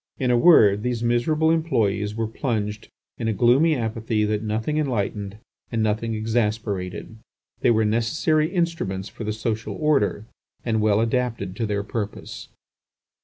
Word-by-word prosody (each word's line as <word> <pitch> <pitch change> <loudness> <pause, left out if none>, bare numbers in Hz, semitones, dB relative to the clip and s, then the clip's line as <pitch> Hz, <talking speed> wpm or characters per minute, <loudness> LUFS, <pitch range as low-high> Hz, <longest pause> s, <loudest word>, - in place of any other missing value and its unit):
In 125 -2 +1
a - - +4
word, 110 - +6
these 120 0 -2
miserable 150 +7 +2
employees 110 -11 0
were 115 0 -1
plunged 110 -2 -3 0.3
in 115 - -2
a 110 - +1
gloomy 130 - +4
apathy 110 -2 -1
that 105 0 -1
nothing 110 +7 -2
enlightened 105 -7 -2 0.3
and 115 -2 0
nothing 110 +1 -1
exasperated. 110 -3 -2 0.4
They - - +2
were 110 -1 +3
necessary 155 +8 +1
instruments 155 - -2
for 110 - -8
the 105 - -1
social 110 +1 -3
order 140 -9 +1 0.4
and 110 -2 +1
well 105 0 +3
adapted 115 -5 -1
to 115 - -1
their 100 -1 -1
purpose. 105 0 -6
110 Hz, 145 wpm, -23 LUFS, 105-125 Hz, 0.4 s, word